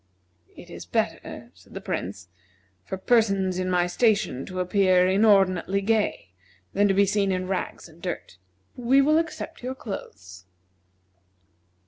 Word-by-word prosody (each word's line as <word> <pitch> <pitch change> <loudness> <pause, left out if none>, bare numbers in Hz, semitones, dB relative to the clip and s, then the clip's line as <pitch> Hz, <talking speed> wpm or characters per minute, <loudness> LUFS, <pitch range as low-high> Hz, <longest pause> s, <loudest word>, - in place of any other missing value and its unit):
"It - - -12
is - - -9
better," - - -3
said - - -19
the - - -4
Prince, 95 0 -5 0.6
"for 190 - -5
persons 195 -4 +2
in 185 0 -1
my 180 -1 +2
station 195 - +1
to 185 0 -5
appear 185 0 +3
inordinately 195 -2 +3
gay 210 - 0 0.4
than 205 +1 +3
to 195 - +2
be 200 +1 +5
seen 200 0 +1
in 185 0 -2
rags 190 -2 -4
and 165 +1 -19
dirt. 175 - -6 0.4
We 250 +2 +3
will 305 +3 +4
accept 325 -2 -5
your 255 +1 -4
clothes." 95 - -9
195 Hz, 140 wpm, -25 LUFS, 180-215 Hz, 0.6 s, be